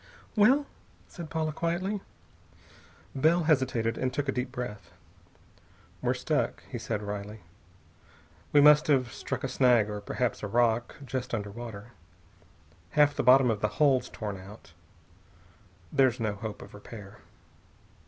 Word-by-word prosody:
"Well?" 255 Hz, +7 st, +5 dB, 0.4 s
said 170 Hz, -3 st, -9 dB
Paula 160 Hz, -1 st, -1 dB
quietly. 175 Hz, +6 st, -2 dB, 1.1 s
Bell 160 Hz, +5 st, +3 dB
hesitated, 130 Hz, -7 st, +1 dB
and 130 Hz, 0 st, 0 dB
took 140 Hz, +2 st, -2 dB
a -, -, +2 dB
deep 125 Hz, 0 st, -3 dB
breath. 120 Hz, -5 st, -6 dB, 1.1 s
"We're -, -, +1 dB
stuck," -, -, -1 dB
he -, -, -6 dB
said 105 Hz, -2 st, -3 dB
wryly. 105 Hz, +1 st, -6 dB, 1.1 s
"We 145 Hz, -, +6 dB
must 150 Hz, +1 st, +7 dB
have 130 Hz, -5 st, +2 dB
struck -, -, -5 dB
a -, -, 0 dB
snag 125 Hz, -5 st, +3 dB
or 105 Hz, 0 st, -5 dB
perhaps 120 Hz, +2 st, -2 dB
a 105 Hz, -, -3 dB
rock, 120 Hz, +2 st, +1 dB
just 125 Hz, -1 st, -3 dB
under 105 Hz, -2 st, -4 dB
water. 115 Hz, 0 st, -8 dB, 1.1 s
Half 145 Hz, -1 st, +5 dB
the -, -, 0 dB
bottom 125 Hz, 0 st, +6 dB
of 105 Hz, -2 st, -3 dB
the 105 Hz, -, +2 dB
hull's 140 Hz, -4 st, +3 dB
torn 105 Hz, -3 st, -5 dB
out. 95 Hz, -3 st, -13 dB, 1.2 s
There's 130 Hz, -3 st, +3 dB
no 110 Hz, -2 st, -1 dB
hope 105 Hz, +1 st, -7 dB
of -, -, -14 dB
repair. 105 Hz, -1 st, -11 dB
125 Hz, 140 wpm, -28 LUFS, 105-145 Hz, 1.2 s, must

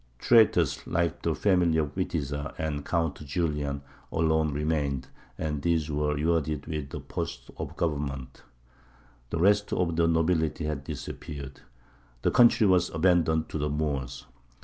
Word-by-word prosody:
Traitors, 115 Hz, -, +4 dB
like 85 Hz, -1 st, 0 dB
the -, -, 0 dB
family 90 Hz, -5 st, +3 dB
of 75 Hz, -2 st, 0 dB
Witiza 75 Hz, -5 st, -3 dB
and 75 Hz, -2 st, -2 dB
Count 80 Hz, -2 st, -1 dB
Julian, 75 Hz, -2 st, -2 dB, 0.3 s
alone 80 Hz, -1 st, +2 dB
remained, 70 Hz, -3 st, -1 dB, 0.3 s
and 75 Hz, -3 st, -2 dB
these 80 Hz, -2 st, +1 dB
were 75 Hz, 0 st, 0 dB
rewarded 75 Hz, -1 st, 0 dB
with 75 Hz, -4 st, -5 dB
posts -, -, -5 dB
of -, -, -6 dB
government. 70 Hz, -5 st, -3 dB, 0.9 s
The -, -, -2 dB
rest 105 Hz, +4 st, +3 dB
of 85 Hz, -2 st, 0 dB
the 85 Hz, -1 st, +4 dB
nobility 80 Hz, -1 st, +1 dB
had 75 Hz, -3 st, -3 dB
disappeared; 70 Hz, -2 st, -7 dB, 0.6 s
the -, -, +3 dB
country 120 Hz, -2 st, +6 dB
was 90 Hz, -2 st, +4 dB
abandoned 80 Hz, -2 st, +2 dB
to 80 Hz, -, -3 dB
the 75 Hz, +1 st, 0 dB
Moors. 70 Hz, -3 st, -2 dB
80 Hz, 135 wpm, -28 LUFS, 75-85 Hz, 0.9 s, country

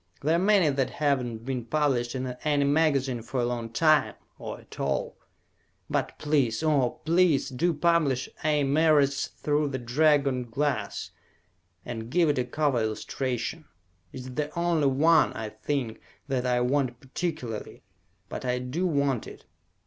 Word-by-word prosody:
There 155 Hz, +4 st, +2 dB
are -, -, +2 dB
many 195 Hz, -2 st, +4 dB
that 135 Hz, -1 st, 0 dB
have 140 Hz, -3 st, +1 dB
not 115 Hz, -1 st, -6 dB
been 130 Hz, -2 st, -2 dB
published 130 Hz, -2 st, 0 dB
in 130 Hz, 0 st, -2 dB, 0.2 s
any 145 Hz, -2 st, +2 dB
magazine 140 Hz, -4 st, +2 dB
for 125 Hz, +3 st, -4 dB
a 120 Hz, -, +1 dB
long 120 Hz, -1 st, -3 dB
time, 155 Hz, +5 st, +3 dB, 0.2 s
or -, -, -6 dB
at -, -, -14 dB
all. -, -, -1 dB, 0.8 s
But -, -, -1 dB
please, 140 Hz, -4 st, +1 dB
oh 145 Hz, -6 st, +1 dB
please, 165 Hz, -3 st, +3 dB
do 140 Hz, +7 st, +1 dB
publish 155 Hz, -5 st, +1 dB, 0.2 s
A. 150 Hz, -2 st, +2 dB
Merritt's 145 Hz, -1 st, +3 dB
"Through 150 Hz, 0 st, -1 dB
the 135 Hz, -2 st, -3 dB
Dragon 135 Hz, 0 st, +2 dB
Glass," 140 Hz, +4 st, -2 dB, 0.7 s
and 115 Hz, -1 st, -6 dB
give 170 Hz, +3 st, +3 dB
it 145 Hz, -, +1 dB
a 125 Hz, -, 0 dB
cover 140 Hz, 0 st, 0 dB
illustration. 125 Hz, +6 st, -3 dB, 0.5 s
It -, -, -8 dB
is 130 Hz, 0 st, -8 dB
the 150 Hz, +2 st, -2 dB
only 170 Hz, -4 st, +2 dB
one, 155 Hz, +4 st, +4 dB
I 110 Hz, -1 st, -5 dB
think, 115 Hz, +1 st, -3 dB, 0.3 s
that 130 Hz, -2 st, -1 dB
I 125 Hz, 0 st, +2 dB
want 125 Hz, -1 st, 0 dB
particularly, 135 Hz, -5 st, -5 dB, 0.4 s
but -, -, -6 dB
I 125 Hz, -1 st, 0 dB
do 130 Hz, +9 st, -2 dB
want 140 Hz, -7 st, 0 dB
it! -, -, -12 dB
140 Hz, 155 wpm, -27 LUFS, 125-155 Hz, 0.8 s, many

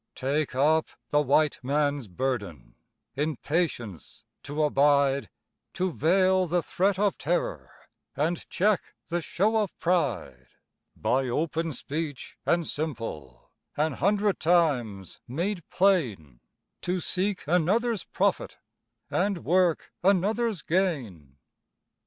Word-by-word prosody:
Take 140 Hz, +1 st, -1 dB
up 155 Hz, +4 st, +3 dB, 0.2 s
the 150 Hz, -, +3 dB
White 150 Hz, +2 st, +2 dB
Man's 145 Hz, -1 st, 0 dB
burden 100 Hz, -, -4 dB, 0.4 s
In 150 Hz, 0 st, -1 dB
patience 125 Hz, -, -3 dB, 0.2 s
to 150 Hz, +2 st, -2 dB
abide, 140 Hz, -1 st, +3 dB, 0.5 s
To 185 Hz, 0 st, 0 dB
veil 185 Hz, +3 st, +3 dB
the 175 Hz, +1 st, +1 dB
threat 195 Hz, +1 st, +1 dB
of 205 Hz, 0 st, +1 dB
terror -, -, -1 dB, 0.5 s
And 160 Hz, +4 st, -1 dB
check 205 Hz, +1 st, 0 dB
the 175 Hz, 0 st, -1 dB
show 205 Hz, +7 st, 0 dB
of 210 Hz, -4 st, -1 dB
pride; 160 Hz, -, -1 dB, 0.5 s
By 130 Hz, +1 st, 0 dB
open 165 Hz, +5 st, -1 dB
speech 150 Hz, 0 st, -5 dB
and 170 Hz, -1 st, +2 dB
simple, 115 Hz, -, -5 dB, 0.3 s
An 155 Hz, 0 st, +1 dB
hundred 200 Hz, +4 st, +1 dB
times 130 Hz, -, +1 dB
made 175 Hz, -, -2 dB
plain, 120 Hz, -, +1 dB, 0.4 s
To 180 Hz, +1 st, -1 dB
seek 190 Hz, +2 st, -1 dB
another's 195 Hz, +8 st, +1 dB
profit, -, -, -1 dB, 0.5 s
And 195 Hz, -2 st, 0 dB
work 180 Hz, -1 st, +2 dB
another's 200 Hz, +2 st, +1 dB
gain. 120 Hz, -, -1 dB
160 Hz, 110 wpm, -27 LUFS, 135-185 Hz, 0.5 s, up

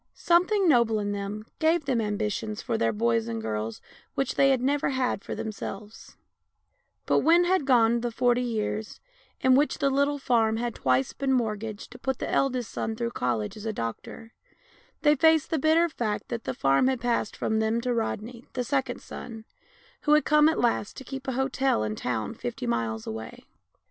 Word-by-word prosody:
Something 365 Hz, +3 st, +3 dB
noble 235 Hz, -7 st, +4 dB
in 205 Hz, -1 st, -2 dB
them 205 Hz, +1 st, -4 dB
gave 320 Hz, -1 st, +2 dB
them 250 Hz, -4 st, +1 dB
ambitions 210 Hz, 0 st, -2 dB
for -, -, -2 dB
their 115 Hz, 0 st, +1 dB
boys 115 Hz, +1 st, +1 dB
and 115 Hz, -1 st, -3 dB
girls 110 Hz, 0 st, -4 dB, 0.3 s
which 270 Hz, -2 st, 0 dB
they 275 Hz, -, +4 dB
had 265 Hz, -2 st, +3 dB
never 280 Hz, +3 st, +1 dB
had 255 Hz, -6 st, -1 dB
for -, -, -5 dB
themselves; 210 Hz, 0 st, -7 dB, 0.9 s
but -, -, +3 dB
when 340 Hz, +2 st, +5 dB
had 355 Hz, -5 st, +1 dB
gone 235 Hz, -2 st, +4 dB
the 240 Hz, -, -1 dB
forty 245 Hz, +1 st, +2 dB
years, 220 Hz, -2 st, -3 dB, 0.4 s
in 260 Hz, -, +5 dB
which 285 Hz, +3 st, +3 dB
the 275 Hz, -, +1 dB
little 280 Hz, +1 st, +1 dB
farm 225 Hz, -5 st, +2 dB
had 240 Hz, 0 st, -2 dB
twice 130 Hz, +1 st, +1 dB
been 275 Hz, -1 st, -1 dB
mortgaged 220 Hz, -3 st, -2 dB
to -, -, -11 dB
put 265 Hz, -1 st, -2 dB
the -, -, -4 dB
eldest 255 Hz, -4 st, 0 dB
son 220 Hz, -, -3 dB
through 235 Hz, +1 st, -2 dB
college 120 Hz, -, -2 dB
as 215 Hz, +1 st, -7 dB
a -, -, 0 dB
doctor, 160 Hz, -, -6 dB, 0.7 s
they 295 Hz, -1 st, +6 dB
faced 320 Hz, +1 st, +3 dB
the 320 Hz, -, +1 dB
bitter 320 Hz, +4 st, +4 dB
fact 230 Hz, -9 st, -3 dB
that 230 Hz, -2 st, -4 dB
the -, -, -3 dB
farm 135 Hz, -, +3 dB
had 260 Hz, -2 st, 0 dB
passed 235 Hz, -2 st, -1 dB
from 220 Hz, 0 st, 0 dB
them 220 Hz, +1 st, +1 dB
to 250 Hz, 0 st, -1 dB
Rodney, 230 Hz, +1 st, -4 dB
the 250 Hz, -, -1 dB
second 260 Hz, 0 st, -2 dB
son, 225 Hz, -2 st, -9 dB, 0.6 s
who 300 Hz, -, +3 dB
had 300 Hz, -, +3 dB
come 300 Hz, 0 st, +5 dB
at 320 Hz, -, -1 dB
last 235 Hz, -4 st, 0 dB
to -, -, -7 dB
keep 270 Hz, +1 st, -7 dB
a 260 Hz, -, -1 dB
hotel 265 Hz, -, +1 dB
in 110 Hz, -, -2 dB
a -, -, -4 dB
town 110 Hz, -4 st, -3 dB
fifty 120 Hz, -, -5 dB
miles 115 Hz, -2 st, -2 dB
away. 110 Hz, 0 st, -7 dB
235 Hz, 195 wpm, -27 LUFS, 205-270 Hz, 0.9 s, they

